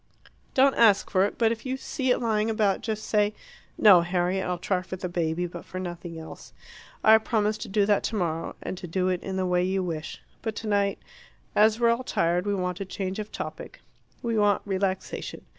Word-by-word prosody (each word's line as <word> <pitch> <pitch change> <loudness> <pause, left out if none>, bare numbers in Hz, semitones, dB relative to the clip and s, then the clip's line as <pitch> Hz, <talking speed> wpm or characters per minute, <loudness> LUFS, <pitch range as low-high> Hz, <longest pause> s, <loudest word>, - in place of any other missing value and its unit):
Don't 270 +1 +5
ask 210 -4 +4
for 190 0 +4
it; 205 - -4
but 225 -1 +3
if 230 - -4
you 260 0 -3
see 265 0 -3
it 250 - +4
lying 220 -2 0
about, 215 -3 +1
just 215 -1 -3
say 210 0 +1 0.2
" - - -27
"No, 195 -5 +7
Harriet; 180 +2 0
I'll 180 0 -1
try 180 +1 -1
for 185 +1 -6
the 185 0 -4
baby, 175 0 -1
but 175 -1 -7
for 185 - -7
nothing 175 -2 -6
else. 160 0 -10 0.5
I 220 0 +7
promise 215 -1 0
to - - -6
do 205 0 +2
that 205 0 +3
tomorrow, 170 -7 -2
and 185 - -5
to 180 - -7
do 185 +2 0
it 180 -1 -1
in 190 - -5
the 190 0 0
way 180 0 +2
you 190 +1 0
wish. 160 -3 -5 0.2
But 220 -2 -3
tonight, 200 -2 0 0.6
as 215 +1 +4
we're 235 -1 +4
all 235 +2 -1
tired, 175 -4 0
we 205 - +1
want 180 -2 -2
a 195 - -3
change 190 +1 -4
of 210 0 -6
topic. - - -7 0.4
We 230 -2 0
want 205 -1 +3
relaxation. 190 -1 -3
195 Hz, 210 wpm, -26 LUFS, 180-215 Hz, 0.6 s, No